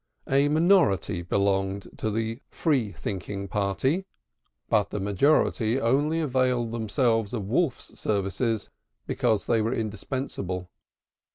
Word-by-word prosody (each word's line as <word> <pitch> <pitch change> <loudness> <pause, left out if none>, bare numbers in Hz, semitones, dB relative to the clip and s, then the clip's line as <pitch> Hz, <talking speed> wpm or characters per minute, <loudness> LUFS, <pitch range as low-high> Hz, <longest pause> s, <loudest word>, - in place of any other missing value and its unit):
A 140 +2 +3
minority 155 - +3
belonged 95 +1 0
to 110 - -1
the 115 +3 -2
Free 130 - 0
thinking 100 +1 -5
party, 105 - 0 0.6
but 105 -3 +2
the 105 - -3
majority 110 +3 +2
only 145 +7 +2
availed 130 -5 +1
themselves 115 -1 0
of 100 -4 -4
Wolf's 145 -1 -1
services 105 +2 -1 0.3
because 110 -3 +1
they 115 -2 +2
were 110 +2 0
indispensable. 105 -5 -4
110 Hz, 110 wpm, -26 LUFS, 100-130 Hz, 0.6 s, A